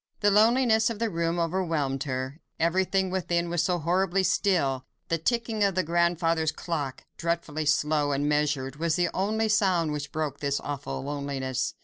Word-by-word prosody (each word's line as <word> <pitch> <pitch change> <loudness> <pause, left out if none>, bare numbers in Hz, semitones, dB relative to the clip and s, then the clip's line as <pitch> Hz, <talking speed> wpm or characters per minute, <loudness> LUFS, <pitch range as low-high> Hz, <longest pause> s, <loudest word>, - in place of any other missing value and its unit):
The 205 - +4
loneliness 220 +1 +4
of 230 - -4
the 230 0 -1
room 170 0 -1
overwhelmed 165 -6 -1
her; 130 +3 -4 0.2
everything 185 +3 +1
within 175 -2 -1
was 175 -2 +1
so 180 +1 +1
horribly 185 +3 +1
still; 165 -9 +1 0.3
the 165 - +1
ticking 225 +3 0
of 195 -3 +2
the 185 - +2
grandfather's 165 -1 +1
clock—dreadfully 155 +1 -3
slow 150 0 +2
and 140 +1 0
measured—was 150 +1 0
the 175 -1 +1
only 215 +3 0
sound 185 -7 +2
which 145 -1 -4
broke 150 -3 -3
this 140 -1 0
awful 140 -2 -5
loneliness. 140 -2 -3
165 Hz, 150 wpm, -27 LUFS, 145-190 Hz, 0.3 s, The